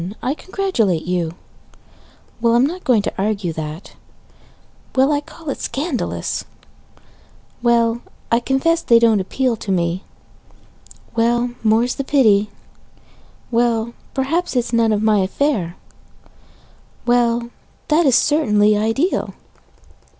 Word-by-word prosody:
I 260 - 0
congratulate 305 - -1
you 175 -2 -2 1.1
Well, 230 0 +3
I'm 245 +2 +4
not 355 +5 -4
going 230 -5 +3
to - - -3
argue 200 -4 -1
that 155 +2 -7 1.0
Well, 265 +3 +4
I 290 -1 +1
call 315 0 -8
it - - -6
scandalous 280 -1 -3 1.2
Well, 235 -1 +2 0.3
I 230 - +4
confess 270 +7 +1
they 235 - +5
don't 230 -2 +4
appeal 245 +6 0
to 200 - -5
me 175 0 0 1.1
Well, 240 +1 +1
more's 225 +3 +2
the 275 - -4
pity 215 -8 +3 1.0
Well, 235 -1 +1 0.2
perhaps 285 +5 -1
it - - +4
is - - -8
none 230 -1 +3
of 210 0 0
my 215 -1 +3
affair 190 - 0 1.3
Well, 240 -1 +1 0.4
that 310 +1 +4
is 260 - +4
certainly 215 -8 +3
ideal! 225 - 0
235 Hz, 120 wpm, -19 LUFS, 210-270 Hz, 1.3 s, they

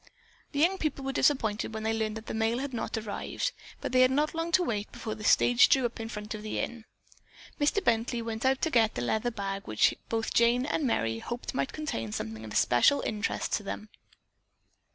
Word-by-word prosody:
The 285 - -5
young 365 +5 +3
people 290 -3 -2
were 270 - -1
disappointed 220 -7 +1
when 220 - -4
they 220 0 +1
learned 220 -1 -1
that 220 - -9
the - - -5
mail 225 +1 +1
had 270 +1 -4
not 235 - -3
arrived, 220 - -3 0.3
but - - -3
they 255 0 +4
had 255 - +6
not 295 +3 +1
long 330 +1 -2
to 365 - +5
wait 210 -9 -2
before 230 -2 -5
the 215 0 -9
stage 245 +3 +5
drew 265 -3 +4
up 240 0 -3
in 225 0 -5
front 210 -1 -6
of 215 - -6
the 215 - -4
inn. 235 -2 -4 0.7
Mr. 295 +7 +2
Bently 235 -2 +1
went 225 -1 -4
out 265 0 +2
to 320 - +1
get 225 -3 +3
the 120 - -2
leather 220 - 0
bag 200 -3 -4
which 110 - +3 0.2
both 225 -1 -1
Jane 235 +2 +4
and 300 0 -1
Merry 115 - 0
hoped 240 - -5
might 265 - -1
contain 195 - -4
something 110 +1 -5
of 110 - -8
especial 120 - +4
interest 210 -1 -2
to - - +1
them. 210 +1 -6
230 Hz, 215 wpm, -29 LUFS, 215-265 Hz, 0.7 s, had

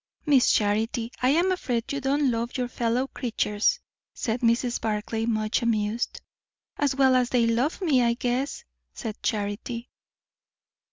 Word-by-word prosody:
"Miss 280 -5 +5
Charity, 225 +3 0
I 255 - +3
am 340 +6 +3
afraid 250 -10 -2
you 280 - -2
do 270 +1 +1
not - - -1
love 235 -1 -1
your 250 -1 -1
fellow 240 +1 0
creatures," 220 -5 0 0.4
said 230 +1 -2
Mrs. 235 +1 +1
Barclay, 220 +1 -2
much 215 +1 0
amused. 225 0 -1 0.5
"As 280 -2 0
well 265 -1 +4
as 250 -1 +2
they 245 -2 +3
love 235 +7 +1
me, 280 -8 +3
I 235 -1 +3
guess," 250 +3 -2 0.3
said 220 -1 -6
Charity. 220 +3 -3
240 Hz, 150 wpm, -26 LUFS, 225-260 Hz, 0.5 s, Miss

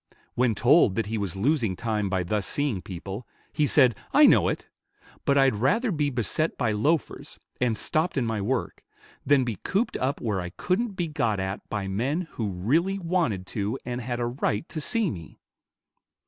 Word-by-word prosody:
When 120 -3 +2
told 120 - +4
that 115 - 0
he 110 +1 -3
was 100 -3 -3
losing 115 -2 +1
time 105 -1 -1
by 95 -1 0
thus 100 +2 -1
seeing 140 -10 -1
people, 95 +6 -7 0.3
he 150 - +2
said, 130 -5 +5 0.2
"I - - +7
know - - +5
it; - - -3 0.6
but 140 - +3
I'd 135 -4 +4
rather 210 - +1
be 150 -4 0
beset 135 +5 -1
by 120 -5 +1
loafers, 145 +10 -1 0.2
and 120 -3 +1
stopped 160 +1 0
in 130 - +1
my 110 -2 -1
work, 125 +4 -2 0.4
than 145 -2 +5
be 115 -5 -3
cooped 205 - -1
up 130 +2 -1
where 105 -5 -1
I 90 - -5
couldn't 190 - -1
be 175 -3 -2
got 120 -10 0
at 95 +1 -4
by 100 -2 -3
men 125 - -1
who 110 -3 -3
really 155 - +1
wanted 165 - -1
to 105 +4 -1
and 125 0 -3
had 120 0 -3
a 120 - 0
right 120 +1 -1
to 155 - -5
see 220 +1 +1
me." 85 -7 -9
120 Hz, 190 wpm, -26 LUFS, 105-150 Hz, 0.6 s, I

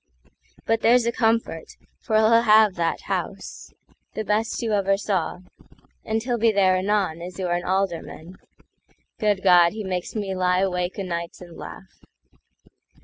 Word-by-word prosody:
But 225 0 +1
there's 240 0 +4
a 235 - +1
comfort, 225 -8 -1 0.2
for 220 - -3
he'll 220 +1 +5
have 215 -3 +5
that 170 -2 -2
House—The 220 - -7
best 215 +2 -1
you 225 -2 -1
ever 195 -1 +2
saw; 185 -4 -2 0.6
and 220 0 -2
he'll 240 -1 -2
be 225 0 +4
thereAnon, 190 -3 +1
as 180 0 -8
you're 180 -2 -2
an 175 0 -1
Alderman. 185 -2 -3 0.8
Good 205 -3 0
God! 175 -2 +5
He 215 0 -5
makes 185 0 -4
me 200 -3 -3
lie 180 0 +1
awake 180 -1 -2
o'nights 170 -3 -5
and 175 -2 -12
laugh. - - -11
195 Hz, 145 wpm, -23 LUFS, 180-220 Hz, 0.8 s, he'll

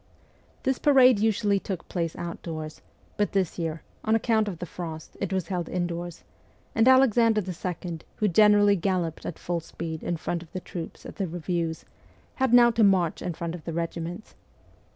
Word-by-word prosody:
This 265 -2 0
parade 260 -6 +6
usually 210 -2 +2
took 190 -3 -5
place 165 -3 -2
outdoors, 160 -2 -6 0.4
but 205 - 0
this 190 -3 0
year, 165 -1 -3 0.2
on 220 0 +2
account 220 -1 +2
of 190 -4 -4
the 175 - -5
frost, 160 -2 -7
it 195 -2 -2
was 185 -3 -1
held 180 -3 -2
indoors, 175 -1 -3 0.5
and 225 +2 +3
Alexander 235 -4 +5
II., 180 -2 -4 0.2
who 215 - +1
generally 205 +1 +5
galloped 180 -3 -1
at 165 - -5
full 175 -1 -2
speed 165 -1 -6
in 175 - -2
front 170 +1 -3
of 165 - -14
the 185 - -3
troops 175 -2 -8
at - - -9
the 195 -3 -1
reviews, 170 -1 -3 0.5
had 265 -3 +2
now 240 -1 +7
to 230 -1 +2
march 185 -5 +3
in 175 - -3
front 170 0 -4
of 175 -3 -8
the 165 - -5
regiments. 170 +4 -4
180 Hz, 175 wpm, -26 LUFS, 170-210 Hz, 0.5 s, now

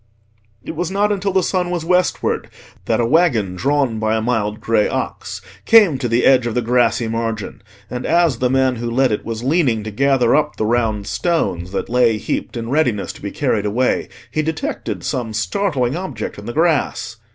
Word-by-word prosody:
It - - -6
was 170 +1 -2
not 205 +2 +1
until 200 -1 -1
the 190 -1 +2
sun 180 0 0
was 175 -2 -3
westward 180 0 0 0.4
that - - +1
a 120 - +2
waggon 120 - +2
drawn 135 0 0
by 110 0 +1
a - - -1
mild 110 -2 -1
grey 110 -1 +2
ox - - -4 0.2
came 200 -12 +6
to 125 - -1
the 115 +1 +1
edge 130 -3 +5
of 115 - -3
the 125 - +2
grassy 120 0 +2
margin, 115 -2 -3 0.3
and 125 +3 -5
as 165 -7 +2
the 125 - +1
man 130 -1 +2
who 120 +1 -3
led 130 +1 +2
it 105 - -2
was 115 0 -5
leaning 130 -6 +1
to 110 - -5
gather 130 +1 +3
up 150 0 +1
the 110 - -1
round 110 -3 0
stones 95 - -1
that - - -2
lay 120 -2 +3
heaped 115 - -3
in 115 +1 -4
readiness 125 -9 0
to - - -15
be 100 - -4
carried 110 -6 -1
away, 125 +5 0 0.2
he 155 - 0
detected 160 0 -4
some 120 -5 -3
startling 130 - -1
object 140 - -5
in 105 - -10
the 120 - -4
grass. 155 -7 0
125 Hz, 195 wpm, -19 LUFS, 110-155 Hz, 0.4 s, came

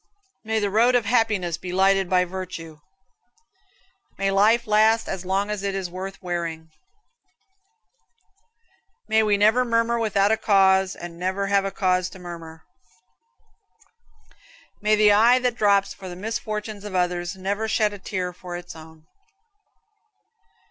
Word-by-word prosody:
May 220 0 -1
the 205 -2 -1
road 235 +4 +3
of 240 -3 +2
happiness 210 -7 +1
be 180 - -7
lighted 190 0 +2
by 180 -1 +3
virtue. 175 -4 -8 1.4
May 195 0 0
life 220 +4 +3
last 220 +1 +3
as 190 -1 -5
long 195 +2 0
as 210 -2 -3
it 200 -1 -2
is 185 -3 -4
worth 190 +2 -7
wearing. 165 -2 -4 2.4
May 220 0 +3
we 210 -2 +2
never 220 +5 +4
murmur 235 0 +1
without 210 -2 +1
a 220 - +2
cause, 190 -3 +3
and 170 -1 -9
never 190 +2 -1
have 200 0 +1
a 195 - -2
cause 185 -2 0
to 190 - -13
murmur. 165 -3 -10 2.2
May 215 0 +3
the 210 0 +5
eye 230 +5 +5
that 250 -1 0
drops 200 -3 +2
for 190 -1 -10
the 175 - -8
misfortunes 215 +1 -5
of 205 -2 -7
others 180 0 -1
never 200 +4 -3
shed 215 -1 +1
a 205 - -9
tear 185 -2 -4
for 175 0 -8
its 175 -1 -10
own. 160 0 -14
195 Hz, 145 wpm, -23 LUFS, 180-215 Hz, 2.4 s, the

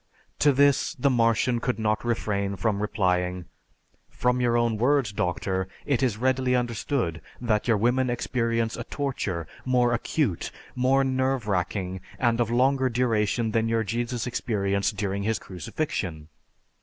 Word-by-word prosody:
To 145 - +5
this, 140 0 +3
the 140 +2 +2
Martian 115 0 +2
could 125 -2 -1
not 110 -1 0
refrain 100 -4 -1
from 100 +2 0
replying, 90 -3 0 0.6
"From 125 0 0
your 120 -1 +2
own 115 -2 +1
words, 125 -2 +2
Doctor, 95 0 -1 0.2
it 135 -5 +1
is 125 -6 +1
readily 130 +1 +1
understood 115 - -1 0.2
that 110 -3 0
your 115 -3 +4
women 125 +4 +2
experience 115 -1 -1
a - - -5
torture 105 - -3 0.2
more 125 -2 +2
acute, 120 - -1 0.2
more 130 +2 +3
nerve 130 -3 0
wracking, 95 -1 -2 0.2
and 120 -1 +2
of 115 - 0
longer 130 +2 +3
duration 115 -2 +1
than 115 +1 +1
your 115 0 +1
Jesus 120 +3 -2
experienced 100 -4 -1
during 100 0 -1
his 110 +1 0
crucifixion. 90 - -4
115 Hz, 145 wpm, -26 LUFS, 100-125 Hz, 0.6 s, To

